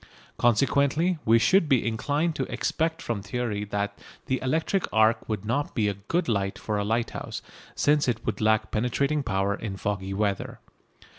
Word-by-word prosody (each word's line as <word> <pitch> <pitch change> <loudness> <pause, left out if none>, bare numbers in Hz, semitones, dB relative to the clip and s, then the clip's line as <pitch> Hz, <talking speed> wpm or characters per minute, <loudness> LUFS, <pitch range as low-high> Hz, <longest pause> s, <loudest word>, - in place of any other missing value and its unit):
Consequently 140 +8 +2
we 115 +1 +6
should 165 - +3
be 125 -6 +3
inclined 145 +8 0
to - - -3
expect 160 0 -1
from 115 -4 -2
theory 105 0 -2
that 100 0 -3 0.3
the 130 - -1
electric 160 +8 0
arc 110 +1 +3
would 105 -2 -2
not 125 +7 -1
be 110 -3 +2
a 100 - 0
good 105 - -2
light 100 -4 0
for 105 -1 -2
a - - 0
lighthouse, 115 +3 -2 0.3
since 145 -1 +3
it 115 -2 -1
would - - -2
lack 110 0 +2
penetrating 140 +6 0
power 100 -5 0
in 100 -2 -5
foggy 95 -1 -3
weather. 100 -1 -1
115 Hz, 165 wpm, -26 LUFS, 105-140 Hz, 0.3 s, we